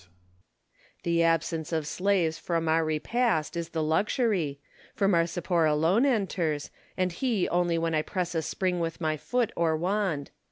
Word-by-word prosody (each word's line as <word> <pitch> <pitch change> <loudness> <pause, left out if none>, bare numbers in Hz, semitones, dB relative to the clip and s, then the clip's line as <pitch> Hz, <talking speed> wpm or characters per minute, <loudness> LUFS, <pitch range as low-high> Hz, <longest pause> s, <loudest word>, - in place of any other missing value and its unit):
The 170 0 +2
absence 165 -1 +1
of 160 -2 -1
slaves 175 -1 0
from 165 -2 -1
our 160 +1 +3
repast 160 +3 0
is 170 -1 -3
the 160 -2 -2
luxury, 170 - 0 0.4
for 200 - +2
Marcipor 170 -2 +2
alone 170 - +3
enters, 180 - -1 0.3
and 185 -1 +1
he 220 +1 0
only 175 -1 +1
when 165 0 0
I 155 - +2
press 175 +1 -3
a 165 - 0
spring 180 +3 -1
with 165 -1 -3
my 155 -2 0
foot 240 - -1
or 160 -2 +1
wand. 180 -4 -1
170 Hz, 155 wpm, -28 LUFS, 160-190 Hz, 0.4 s, our